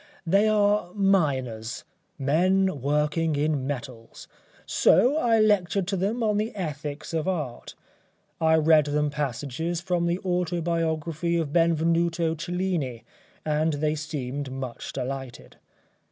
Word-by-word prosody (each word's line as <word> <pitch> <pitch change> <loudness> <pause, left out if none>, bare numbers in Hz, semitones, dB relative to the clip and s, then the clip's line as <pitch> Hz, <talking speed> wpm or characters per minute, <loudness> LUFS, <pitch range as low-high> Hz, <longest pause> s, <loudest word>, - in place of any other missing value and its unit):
They 195 +5 +3
are 205 -3 +2
miners 135 - 0 0.3
men 175 +3 +2
working 150 +3 +1
in 145 -2 0
metals, 125 -4 -7 0.4
so 260 +5 +4
I 235 -7 +3
lectured 200 -3 +2
to 200 - 0
them 205 +6 -1
on 210 -1 +1
the 215 +1 -2
Ethics 150 -4 -5
of 160 +1 -1
Art. 150 -10 -4 0.7
I 160 0 +4
read 155 -1 +5
them 150 0 0
passages 150 +4 -3
from 175 -1 -1
the 170 +1 +1
autobiography 170 -2 -1
of 155 -3 -2
Benvenuto 165 0 +2
Cellini 165 -7 -3 0.4
and 155 +1 +1
they 150 +1 0
seemed 145 -3 -4
much 130 -2 -6
delighted. 130 -1 -6
160 Hz, 120 wpm, -26 LUFS, 145-180 Hz, 0.7 s, read